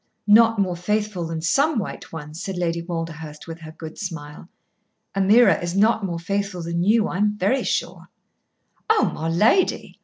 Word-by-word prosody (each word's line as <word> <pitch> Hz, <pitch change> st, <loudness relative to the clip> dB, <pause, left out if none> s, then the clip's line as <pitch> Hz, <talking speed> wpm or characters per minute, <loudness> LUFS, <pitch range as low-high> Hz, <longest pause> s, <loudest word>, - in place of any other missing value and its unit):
"Not 225 Hz, +2 st, +6 dB
more 185 Hz, -3 st, 0 dB
faithful 205 Hz, -1 st, -2 dB
than 165 Hz, -1 st, -4 dB
some 280 Hz, -, +2 dB
white 205 Hz, -, -5 dB
ones," 155 Hz, +1 st, -8 dB
said 195 Hz, -2 st, -4 dB
Lady 170 Hz, -1 st, -1 dB
Walderhurst 165 Hz, -3 st, -6 dB
with 165 Hz, -1 st, -8 dB
her 155 Hz, -1 st, -10 dB
good 160 Hz, 0 st, -10 dB
smile. 165 Hz, -4 st, -7 dB, 0.7 s
"Ameerah 195 Hz, -1 st, +5 dB
is 175 Hz, +2 st, -3 dB
not 220 Hz, +1 st, +3 dB
more 175 Hz, -3 st, -2 dB
faithful 195 Hz, 0 st, -3 dB
than 170 Hz, +1 st, -2 dB
you, 215 Hz, +4 st, +3 dB
I'm 210 Hz, +3 st, 0 dB
very 210 Hz, +8 st, +1 dB
sure." -, -, -3 dB, 0.8 s
"Oh, 440 Hz, -1 st, +3 dB
my 160 Hz, +1 st, -3 dB
lady!" 215 Hz, -, +2 dB
180 Hz, 160 wpm, -22 LUFS, 165-210 Hz, 0.8 s, Not